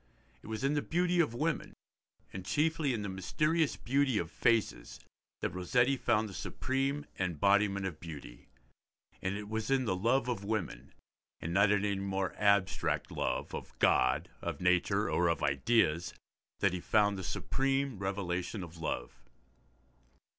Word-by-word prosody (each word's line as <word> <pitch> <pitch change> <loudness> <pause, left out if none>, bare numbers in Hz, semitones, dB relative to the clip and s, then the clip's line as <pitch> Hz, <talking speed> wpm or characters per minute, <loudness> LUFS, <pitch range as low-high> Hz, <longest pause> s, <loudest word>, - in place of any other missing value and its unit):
It - - -13
was 110 +3 -4
in 135 +2 +2
the 145 - +1
beauty 175 +2 +1
of 150 -9 +2
women, 155 +5 -1 0.6
and 95 - -5
chiefly 150 - +1
in 110 -4 -2
the - - -3
mysterious 150 - 0
beauty 135 -2 +1
of 85 -4 -2
faces, 115 -3 0 0.4
that - - -1
Rossetti 120 +9 +2
found 110 -4 +1
the 100 - -9
supreme 135 +8 -2
embodiment 100 +3 +2
of 85 -5 -4
beauty; 75 -8 -9 0.7
and 95 +1 -1
it 105 0 -6
was 110 +2 -3
in 135 -1 +2
the 95 - 0
love 120 +7 +2
of 115 -5 -2
women, 105 -3 -3 0.5
and 85 - -4
not 100 +2 +5
in 105 0 +2
any 100 -1 0
more 95 -1 -2
abstract 100 -2 +2
love, - - -2
of - - -7
God, 65 0 +3
of - - -4
nature, 90 0 +2
or 85 - +2
of 85 -1 0
ideas, 80 - +2 0.5
that 100 -2 +3
he 90 - -2
found 105 +2 +2
the 95 - -5
supreme 135 +5 -1
revelation 95 0 -2
of 85 -1 -10
love. 80 -5 -4
100 Hz, 155 wpm, -32 LUFS, 90-130 Hz, 0.7 s, not